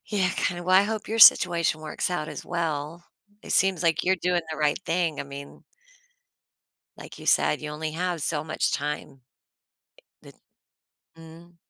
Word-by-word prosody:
Yeah, 190 Hz, -4 st, 0 dB
kinda 175 Hz, -1 st, -2 dB
Well, 185 Hz, +1 st, +2 dB
I 195 Hz, -, +6 dB
hope 215 Hz, 0 st, -4 dB
your 225 Hz, +1 st, -3 dB
situation 170 Hz, -6 st, +6 dB
works 155 Hz, +3 st, -3 dB
out 160 Hz, -3 st, -3 dB
as -, -, -8 dB
well. 165 Hz, -1 st, -4 dB, 0.4 s
It -, -, -5 dB
seems 190 Hz, -2 st, +2 dB
like 165 Hz, -1 st, +1 dB
you're 190 Hz, +1 st, +2 dB
doing 180 Hz, -1 st, 0 dB
the 155 Hz, -, -5 dB
right 150 Hz, +1 st, 0 dB
thing. 165 Hz, -3 st, -1 dB
I -, -, -5 dB
mean 140 Hz, 0 st, -11 dB, 1.3 s
like -, -, -12 dB
you -, -, -11 dB
said, -, -, +2 dB
you 150 Hz, -, -5 dB
only 155 Hz, +1 st, -5 dB
have 175 Hz, -1 st, -3 dB
so 150 Hz, -1 st, -2 dB
much 155 Hz, 0 st, -2 dB
time. 145 Hz, -2 st, -4 dB, 1.0 s
But -, -, -15 dB, 0.8 s
Mm. 165 Hz, +1 st, -15 dB
170 Hz, 165 wpm, -25 LUFS, 155-180 Hz, 1.3 s, I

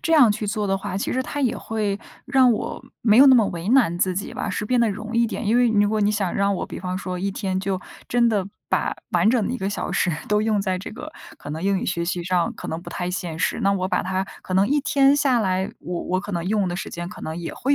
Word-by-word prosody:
这 330 Hz, -, 0 dB
样 265 Hz, -8 st, +7 dB
去 210 Hz, +1 st, -4 dB
做 210 Hz, 0 st, -1 dB
的 195 Hz, 0 st, +1 dB
话， 190 Hz, -, -4 dB
其 200 Hz, -, -2 dB
实 260 Hz, +1 st, 0 dB
它 290 Hz, -, -4 dB
也 255 Hz, -4 st, +1 dB
会 210 Hz, -2 st, -2 dB, 0.3 s
让 260 Hz, -2 st, +4 dB
我 215 Hz, -, -4 dB, 0.2 s
没 215 Hz, -2 st, +5 dB
有 275 Hz, -, +9 dB
那 265 Hz, -, +8 dB
么 230 Hz, -4 st, +5 dB
为 170 Hz, +1 st, -5 dB
难 230 Hz, -9 st, +4 dB
自 185 Hz, 0 st, +1 dB
己 200 Hz, +3 st, -4 dB
吧， -, -, -3 dB
是 -, -, -2 dB
变 245 Hz, +3 st, +2 dB
得 230 Hz, -2 st, +3 dB
容 215 Hz, +3 st, -6 dB
易 235 Hz, 0 st, +4 dB
点。 225 Hz, 0 st, -4 dB
因 220 Hz, +3 st, +3 dB
为 245 Hz, -1 st, +4 dB
如 205 Hz, -2 st, +3 dB
果 215 Hz, 0 st, 0 dB
你 205 Hz, 0 st, +3 dB
想 200 Hz, -4 st, -1 dB
让 200 Hz, 0 st, +2 dB
我 -, -, -3 dB
比 -, -, -7 dB
方 180 Hz, 0 st, -3 dB
说 185 Hz, -1 st, -4 dB
一 195 Hz, +2 st, -1 dB
天 190 Hz, -1 st, -2 dB
就 195 Hz, -1 st, -1 dB, 0.3 s
真 240 Hz, -1 st, +3 dB
的 205 Hz, -4 st, 0 dB, 0.2 s
把 -, -, 0 dB
完 -, -, +3 dB
整 230 Hz, -5 st, +2 dB
的 -, -, -2 dB
一 -, -, -2 dB
个 195 Hz, -, -2 dB
小 -, -, -3 dB
时 180 Hz, -, +1 dB, 0.2 s
都 210 Hz, 0 st, +2 dB
用 215 Hz, -2 st, +1 dB
在 190 Hz, -2 st, -1 dB
这 185 Hz, -, -7 dB
个 300 Hz, +8 st, -9 dB, 0.3 s
可 -, -, -8 dB
能 160 Hz, +3 st, -5 dB
英 195 Hz, 0 st, +2 dB
语 -, -, -3 dB
学 170 Hz, -2 st, -1 dB
习 175 Hz, 0 st, -2 dB
上， 180 Hz, -2 st, +1 dB
可 -, -, -7 dB
能 160 Hz, -, -3 dB
不 -, -, -10 dB
太 180 Hz, -, -3 dB
现 175 Hz, -3 st, -4 dB
实。 -, -, 0 dB
那 200 Hz, 0 st, +3 dB
我 185 Hz, -1 st, 0 dB
把 -, -, 0 dB
它 190 Hz, +1 st, -1 dB, 0.2 s
可 185 Hz, -, -4 dB
能 190 Hz, +2 st, +4 dB
一 290 Hz, +4 st, +2 dB
天 275 Hz, -1 st, +4 dB
下 280 Hz, -4 st, +3 dB
来， 190 Hz, -3 st, 0 dB
我 175 Hz, -1 st, -4 dB
我 185 Hz, -, -1 dB
可 205 Hz, +1 st, -7 dB
能 170 Hz, -2 st, -2 dB
用 200 Hz, +1 st, +1 dB
的 175 Hz, -, -3 dB
时 190 Hz, -, -4 dB
间 175 Hz, 0 st, -5 dB
可 -, -, -11 dB
能 160 Hz, +1 st, -5 dB
也 170 Hz, -1 st, -5 dB
会 280 Hz, +2 st, +1 dB
200 Hz, 310 characters per minute, -23 LUFS, 185-230 Hz, 0.3 s, 有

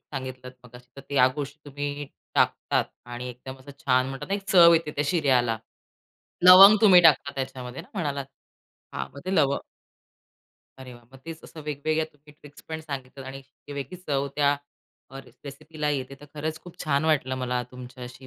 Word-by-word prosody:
सांगितलंत 130 Hz, -1 st, -7 dB
मगाशी 125 Hz, 0 st, -15 dB
तर 140 Hz, -, -10 dB
या 125 Hz, -2 st, +6 dB
गोष्टी 145 Hz, 0 st, -5 dB
तुम्ही 145 Hz, 0 st, -5 dB, 0.3 s
टाकतात -, -, +1 dB, 0.2 s
आणि 120 Hz, +1 st, -6 dB
एकदम 130 Hz, +2 st, -10 dB
असं 130 Hz, +2 st, -13 dB
छान 130 Hz, -1 st, +3 dB
म्हणतात 135 Hz, +6 st, -7 dB
ना, 195 Hz, -, 0 dB
एक 200 Hz, -, -4 dB
चव 170 Hz, -2 st, +8 dB
येते 160 Hz, -2 st, 0 dB
त्या 145 Hz, 0 st, -2 dB
शिऱ्याला. 130 Hz, -9 st, +2 dB, 0.9 s
लवंग 190 Hz, +3 st, +10 dB
तुम्ही 190 Hz, -5 st, +8 dB
टाकता 145 Hz, -3 st, +4 dB
त्याच्यामध्ये 130 Hz, +1 st, -6 dB
म्हणालात. 145 Hz, -7 st, -2 dB, 0.7 s
हां, -, -, -4 dB
मग 140 Hz, -, -9 dB
ते 185 Hz, +1 st, -2 dB
लवंग 140 Hz, -4 st, +2 dB, 1.2 s
अरे 130 Hz, -1 st, -10 dB
वाह! 120 Hz, 0 st, -17 dB
मग 135 Hz, -, -14 dB
तेच 165 Hz, -1 st, -8 dB
असं 160 Hz, -, -11 dB
वेगवेगळ्या 150 Hz, +2 st, -1 dB
तुम्ही 150 Hz, +1 st, -20 dB
ट्रिक्स 145 Hz, -1 st, -16 dB
पण 160 Hz, 0 st, -5 dB
सांगितलं 135 Hz, -3 st, -8 dB
आणि 135 Hz, +1 st, -8 dB
ती 140 Hz, -, -13 dB
वेगळीच 140 Hz, +6 st, -7 dB
चव 140 Hz, -1 st, 0 dB
त्या 145 Hz, -1 st, +3 dB, 0.5 s
अ, 135 Hz, -, -9 dB, 0.3 s
रेसिपीला 150 Hz, +2 st, -5 dB
येते 135 Hz, -2 st, -3 dB
तर 145 Hz, -, -12 dB
खरंच 155 Hz, +2 st, -4 dB
खूप 175 Hz, -, -13 dB
छान 140 Hz, 0 st, +1 dB
वाटलं 135 Hz, -5 st, +1 dB
मला 125 Hz, -1 st, -2 dB
तुमच्याशी 125 Hz, +1 st, -11 dB
140 Hz, 170 wpm, -25 LUFS, 130-155 Hz, 1.2 s, लवंग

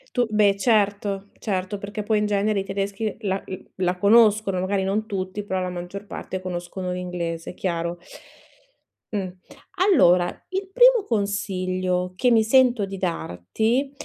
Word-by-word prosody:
Tu 245 Hz, -2 st, +3 dB
beh 210 Hz, -2 st, +3 dB
certo, 200 Hz, -2 st, +1 dB
certo, 190 Hz, -1 st, -2 dB
perché 200 Hz, +1 st, -5 dB
poi 215 Hz, +1 st, +1 dB
in 210 Hz, -, +1 dB
genere 205 Hz, 0 st, +1 dB
i -, -, -4 dB
tedeschi 195 Hz, +2 st, -3 dB
la 195 Hz, -3 st, -2 dB
l 185 Hz, -, -7 dB
la 180 Hz, -1 st, 0 dB
conoscono, 210 Hz, -1 st, +4 dB
magari 190 Hz, +1 st, 0 dB
non 200 Hz, +3 st, -1 dB
tutti, 190 Hz, -1 st, -4 dB
però 190 Hz, -2 st, -2 dB
la 185 Hz, -, -2 dB
maggior 180 Hz, +3 st, -7 dB
parte 190 Hz, -1 st, -6 dB
conoscono 180 Hz, 0 st, -5 dB
l'inglese, 175 Hz, -2 st, -4 dB
chiaro. 170 Hz, -2 st, -2 dB, 1.2 s
Mh. 200 Hz, -3 st, -2 dB, 0.7 s
Allora, 175 Hz, -, +5 dB, 0.2 s
il 380 Hz, 0 st, -3 dB
primo -, -, +6 dB
consiglio 185 Hz, -4 st, -1 dB
che 250 Hz, +7 st, +2 dB
mi 225 Hz, -2 st, +5 dB
sento 245 Hz, -1 st, +4 dB
di 195 Hz, 0 st, -6 dB
darti, 185 Hz, -, -1 dB
195 Hz, 145 wpm, -23 LUFS, 185-215 Hz, 1.2 s, primo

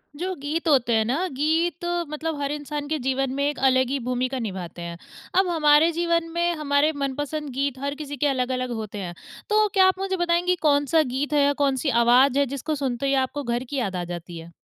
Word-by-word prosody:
जो 370 Hz, +4 st, -3 dB
गीत 315 Hz, +4 st, -2 dB
होते 260 Hz, -6 st, +3 dB
हैं 220 Hz, 0 st, +2 dB
ना, 285 Hz, +11 st, 0 dB
गीत 320 Hz, +4 st, 0 dB, 0.2 s
मतलब 305 Hz, 0 st, -4 dB
हर 280 Hz, 0 st, -1 dB
इंसान 295 Hz, 0 st, -4 dB
के 315 Hz, -, 0 dB
जीवन 270 Hz, 0 st, 0 dB
में 280 Hz, +1 st, 0 dB
एक 295 Hz, -, -5 dB
अलग 260 Hz, -1 st, +2 dB
ही 275 Hz, +1 st, -1 dB
भूमिका 255 Hz, +1 st, -2 dB
निभाते 185 Hz, -6 st, -6 dB
हैं। 170 Hz, 0 st, -6 dB, 0.4 s
अब 380 Hz, -, +3 dB
हमारे 315 Hz, -1 st, +4 dB
जीवन 335 Hz, 0 st, 0 dB
में 345 Hz, 0 st, +1 dB
हमारे 295 Hz, 0 st, +2 dB
मनपसंद 290 Hz, +2 st, -3 dB
गीत 270 Hz, 0 st, -2 dB
हर 280 Hz, +1 st, -3 dB
किसी 290 Hz, -1 st, -7 dB
के 295 Hz, -, +1 dB
अलग-अलग 255 Hz, -2 st, -1 dB
होते 210 Hz, -1 st, -7 dB
हैं। 180 Hz, -3 st, -5 dB, 0.4 s
तो 425 Hz, 0 st, +4 dB
क्या 380 Hz, -2 st, +6 dB
आप 375 Hz, 0 st, +1 dB
मुझे 385 Hz, -1 st, -1 dB
बताएँगी 350 Hz, +1 st, +2 dB
कौन-सा 290 Hz, +2 st, +3 dB
गीत 290 Hz, +3 st, -2 dB
है 295 Hz, -, +4 dB
या 285 Hz, 0 st, +3 dB
कौन-सी 275 Hz, +1 st, +1 dB
आवाज़ 255 Hz, +3 st, +5 dB
है 285 Hz, -, +3 dB
जिसको 300 Hz, +3 st, -3 dB
सुनते 270 Hz, -2 st, -2 dB
ही 275 Hz, -, +2 dB
आपको 290 Hz, +2 st, -6 dB
घर 240 Hz, 0 st, -1 dB
की 275 Hz, +3 st, -6 dB
याद 200 Hz, -7 st, -2 dB
आ 180 Hz, -, -2 dB
जाती 175 Hz, 0 st, -7 dB
है? 165 Hz, +1 st, -10 dB
285 Hz, 215 wpm, -24 LUFS, 255-315 Hz, 0.4 s, क्या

